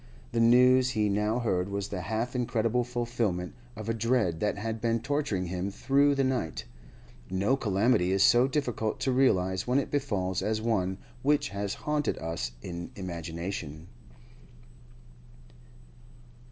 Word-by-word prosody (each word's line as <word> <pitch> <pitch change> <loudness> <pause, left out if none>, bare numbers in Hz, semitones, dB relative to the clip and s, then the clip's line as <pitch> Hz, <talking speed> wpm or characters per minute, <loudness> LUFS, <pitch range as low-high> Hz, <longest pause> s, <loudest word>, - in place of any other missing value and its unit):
The 115 - 0
news 125 +2 +6
he 110 -4 +1
now 105 +3 +1
heard 95 -6 0
was 100 0 -3
the 95 -3 -4
half 110 +7 -2
incredible 120 0 +1
fulfilment 120 -7 -2 0.2
of 110 -1 -7
a 115 - +1
dread 115 -7 +1
that 105 +1 0
had 110 +1 -4
been 115 0 +1
torturing 115 -7 -1
him 90 +2 -3
through 140 +7 +2
the 135 - +2
night. 130 - -2 0.6
No 95 +8 +1
calamity 100 -4 +2
is 95 0 +3
so 120 +2 +6
difficult 125 -6 -2
to 135 - +1
realise 95 -8 +2
when 125 +2 +2
it 140 - -1
befalls 100 -11 -1
as 110 0 0
one 95 -5 0 0.2
which 145 +2 +2
has 100 0 -3
haunted 150 -1 0
us 75 -8 -4
in 85 -1 -6
imagination. 85 -2 -5
110 Hz, 140 wpm, -29 LUFS, 95-125 Hz, 0.6 s, news